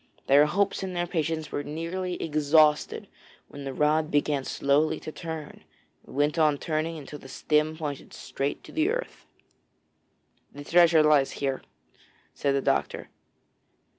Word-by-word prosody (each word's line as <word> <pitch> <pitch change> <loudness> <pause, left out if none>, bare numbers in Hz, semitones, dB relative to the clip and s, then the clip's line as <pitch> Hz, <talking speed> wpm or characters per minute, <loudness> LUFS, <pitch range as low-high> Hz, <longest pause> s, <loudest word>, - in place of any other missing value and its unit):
Their 145 +2 +5
hopes 200 +5 0
and 185 -1 -4
their 175 0 0
patience 160 -2 -2
were - - -2
nearly 170 +5 -4
exhausted 150 0 +2 0.4
when 140 -1 -9
the 135 - -3
rod 150 +3 +1
began 145 -1 +1
slowly 150 +4 +1
to 155 - -7
turn, 160 -2 -7 0.4
and - - -12
went 150 +3 +1
on 150 -2 +3
turning 160 +2 -2
until 150 0 -9
the 135 - -13
stem 155 +3 0
pointed 145 -4 -6
straight 140 +1 -4
to - - -12
the 320 +4 +1
earth. - - -4 1.3
'The 145 - -9
treasure 170 0 +5
lies 150 -3 +3
here,' 135 -1 -2 0.7
said 140 -1 0
the 140 - 0
doctor. - - -1
155 Hz, 145 wpm, -27 LUFS, 145-165 Hz, 1.3 s, Their